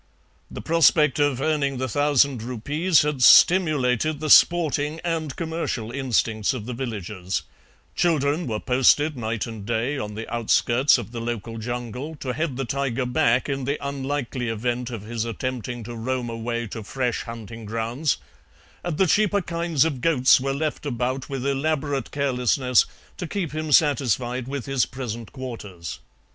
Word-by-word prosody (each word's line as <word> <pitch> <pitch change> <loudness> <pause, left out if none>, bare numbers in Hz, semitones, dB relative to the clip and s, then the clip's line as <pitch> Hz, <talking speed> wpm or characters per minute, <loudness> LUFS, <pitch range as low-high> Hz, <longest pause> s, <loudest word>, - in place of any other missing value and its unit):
The - - -8
prospect 155 -3 +4
of 145 -3 +1
earning 140 -3 0
the 130 +1 -2
thousand 140 -1 +2
rupees 145 +9 +1
had 150 -3 -2
stimulated 155 - +5
the 155 -1 -1
sporting 155 -2 +4
and 160 -5 -2
commercial 160 -9 -3
instinct 120 -4 0
of 110 -4 -6
the 125 - -4
villagers; 105 -7 -4 0.5
children 155 -1 +1
were 110 -2 -2
posted 135 +4 +3
night 115 -2 -2
and 110 -4 -8
day 120 +6 -1
on 105 -2 -5
the 110 +1 -6
outskirts 120 +4 +3
of 115 -3 -7
the 120 -1 -5
local 115 -1 -4
jungle 120 +6 -5
to 130 -3 -4
head 155 -4 -2
the 135 - -2
tiger 135 -1 -1
back 125 0 +2
in 135 -2 -2
the 140 +3 -1
unlikely 135 -3 -3
event 120 +2 -2
of 115 -4 -6
his 115 +1 -3
attempting 120 +1 -4
to 120 +2 -7
roam 120 +1 -3
away 115 +1 -3
to 110 +1 -7
fresh 125 +3 -2
hunting 115 -1 -8
grounds, 115 +7 -1 0.7
and 175 -4 -3
the 190 - +4
cheaper 205 +3 +3
kinds 170 -4 +1
of 140 -6 -2
goats 130 -5 +4
were 135 +1 -1
left 150 +2 -2
about 130 -1 -2
with 135 -2 -4
elaborate 140 0 -1
carelessness 125 -2 +2 0.3
to 175 - -4
keep 175 -2 -3
him 155 0 -3
satisfied 130 -4 +2
with 135 -3 -4
his 135 -2 +1
present 120 -4 -6
quarters. 105 - -7
130 Hz, 155 wpm, -24 LUFS, 115-145 Hz, 0.7 s, stimulated